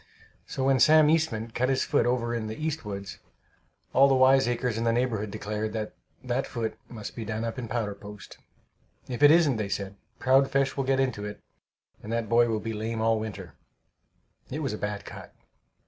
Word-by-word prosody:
So 135 - -3
when 135 -1 +3
Sam 155 +4 +6
Eastman 115 -9 0
cut 125 +3 0
his 135 -1 +2
foot - - +1
over 120 -1 0
in 115 -2 -2
the 110 - -6
"east 160 -1 -3
woods," 100 -2 -6 0.7
all 135 +1 +6
the 135 - +3
wiseacres 130 -2 +3
in 115 - -2
the 115 - +2
neighborhood 115 -3 0
declared 105 +1 -4
that 110 -1 -4 0.3
that 125 +1 -1
foot 115 -2 -3
must 110 -3 -8
be 115 - -5
done 110 +1 -3
up 115 +2 -3
in 120 - -5
powder 110 -3 -2
post. 100 0 -12 0.7
"If 125 0 -5
it 145 - +9
isn't," 155 -6 +5
they 105 -2 -2
said, 100 0 -4 0.2
"proud 135 +1 +4
flesh 135 0 +1
will 135 - -1
get 135 0 +2
into 130 -6 0
it, 105 - -8 0.6
and 110 - -7
that 115 -1 -1
boy 120 0 +4
will 110 -1 0
be 115 +1 -4
lame 110 +1 -3
all 110 0 +2
winter." 100 -7 -7 1.0
It 155 +4 -4
was 135 - -2
a - - -3
bad 105 -1 -4
cut. - - -10
115 Hz, 200 wpm, -27 LUFS, 110-130 Hz, 1.0 s, it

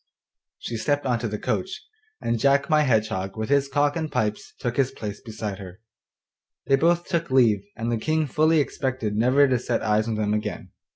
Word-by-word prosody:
She 115 - -5
stepped 145 +5 0
into 120 -2 0
the 105 0 -3
coach, 190 - -2 0.4
and 115 - -1
Jack 140 +4 +2
my 155 0 +5
Hedgehog 110 -7 0
with 110 +2 -3
his 140 -1 +3
cock 145 +1 +1
and 160 -2 -3
pipes 105 -1 -2
took 120 -1 -2
his 135 -2 +3
place 105 -5 -7
beside 110 -3 -6
her. 95 -1 -10 0.9
They 135 - +4
both 170 +4 +2
took 170 -3 -2
leave, 120 -6 +4
and 115 +1 -3
the 115 - +1
King 155 +5 0
fully 155 +3 +3
expected 130 -7 -2
never 130 +6 +4
to 130 -2 +1
set - - -2
eyes 110 0 +1
on 115 - -1
them 105 -1 0
again. 105 0 -4
125 Hz, 190 wpm, -24 LUFS, 110-145 Hz, 0.9 s, my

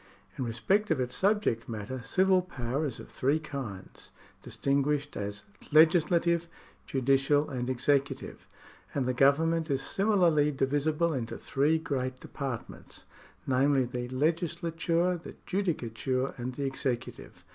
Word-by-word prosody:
— - - -32
In 130 - 0
respect 155 - +1
of 160 -5 +1
its 125 -1 -1
subject 200 - +1
matter, 115 +3 -5
civil 185 - +3
power 140 -3 -3
is 125 - -7
of - - -10
three 140 +4 +1
kinds, 135 -11 -7 0.3
distinguished 140 +1 -1
as 100 0 -5 0.3
legislative, 170 +2 +4 0.4
judicial, 135 +2 +2
and 125 -1 -3
executive; 135 +2 -1 0.5
and 135 -3 +1
the 130 - 0
government 160 +5 +3
is 135 -1 0
similarly 175 -6 +3
divisible 145 +4 +1
into 120 -4 -4
three 145 +4 +1
great 130 -5 -3
departments, 135 -5 -7 0.4
namely, 135 +1 +3
the 120 0 -4
legislature, 170 +4 0
the - - -10
judicature, 130 - -1
and 125 +1 -5
the 140 - -3
executive. 135 -3 -4
140 Hz, 125 wpm, -29 LUFS, 130-165 Hz, 0.5 s, legislative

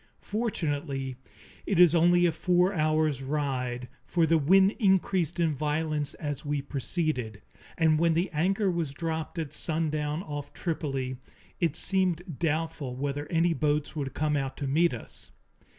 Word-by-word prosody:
Fortunately 145 - -2 0.5
it 200 - +1
is 175 -2 +7
only 175 +1 +5
a 170 - +4
four 180 +3 +2
hours' 155 -4 +1
ride, 130 -3 -2 0.2
for 170 -2 +2
the 165 0 +3
wind 190 +6 +5
increased 190 - +2
in 165 -3 +2
violence 150 0 -1
as 145 -3 -4
we 145 -1 -1
proceeded, 135 - -3 0.3
and 160 -2 +3
when 165 -1 +3
the 175 +3 +2
anchor 190 +5 +1
was 165 -5 -2
dropped 160 +1 -3
at 155 -3 -3
sundown 155 0 -1
off 145 -3 -6
Tripoli, 135 -6 -3 0.4
it 165 -4 +1
seemed 175 -3 -1
doubtful 160 -5 -1
whether 145 +2 -3
any 165 +1 +2
boats 150 -1 0
could 140 -4 -4
come 150 0 +1
out 135 -2 -2
to 145 - -3
meet 155 +5 +3
us. 115 - -11
155 Hz, 150 wpm, -28 LUFS, 145-170 Hz, 0.5 s, is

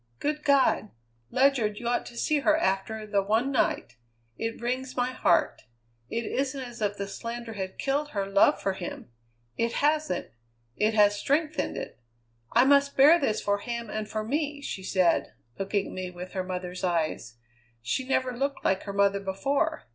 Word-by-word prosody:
Good 300 0 -2
God! 275 -6 +3 0.4
Ledyard, 255 - +2
you 235 - -5
ought 240 - 0
to 235 - -11
see 300 +4 +1
her 250 -6 +3
after 195 +3 -1
the 205 -1 +1
one 220 +7 +1
night! 120 - 0 0.4
It 225 0 -4
wrings 255 +2 -3
my 250 +1 +1
heart. 175 -9 +1 0.4
It 230 0 -2
isn't 275 +3 -1
as 240 -3 -8
if 205 -1 0
the 200 - -3
slander 230 +2 -6
had 190 -2 -5
killed 285 +2 -1
her 200 -7 -2
love 195 0 +4
for 195 - -1
him. 175 -9 -7 0.5
It 230 0 +1
hasn't; 300 - 0 0.4
it 215 +1 +1
has 205 -1 +4
strengthened 305 +4 0
it. - - -7 0.6
'I 240 +2 +7
must 280 0 +4
bear 300 +6 +8
this 220 -8 0
for 205 0 +1
him 235 0 -5
and 215 -1 -4
for 215 0 -2
me,' 290 +4 -2
she 195 - -4
said, 185 -2 +1 0.3
looking 195 0 0
at - - -9
me 185 -1 -4
with 180 +1 -8
her 190 -2 -2
mother's 180 0 -5
eyes. 160 -9 -1 0.5
She 125 - -1
never 255 -1 0
looked 275 +3 -2
like 190 - +2
her 200 - -5
mother 200 0 +3
before. 275 +11 -1
225 Hz, 180 wpm, -27 LUFS, 195-270 Hz, 0.6 s, bear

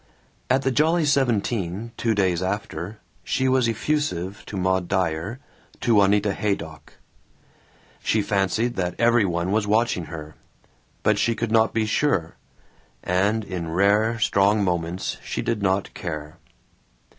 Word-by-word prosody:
At 130 +1 +2
the 135 - +1
Jolly 160 +4 +2
Seventeen, 115 - 0
two 115 -2 0
days 95 -4 +1
after, 95 0 -4 0.3
she 130 - 0
was 130 -2 +3
effusive 105 - -2
to 100 - -5
Maud 95 -1 +1
Dyer, 95 +3 -1 0.4
to 120 -2 +2
Juanita 100 0 +4
Haydock. 85 -9 -4 1.1
She 110 -1 +1
fancied 100 +4 0
that 90 -1 -1
every 120 -2 +4
one 85 0 -1
was 105 0 +1
watching 110 -5 +1
her, 75 -1 -8 0.7
but 105 -1 +3
she 115 +1 +1
could 115 -1 -3
not 110 0 +4
be 110 -1 0
sure, 105 - 0 0.7
and 100 +5 +1
in 90 -5 -5
rare 105 +4 +3
strong 100 0 +3
moments 90 -1 -2
she - - -3
did 110 -3 -1
not 95 0 0
care. 75 -3 -6
100 Hz, 135 wpm, -24 LUFS, 90-115 Hz, 1.1 s, Juanita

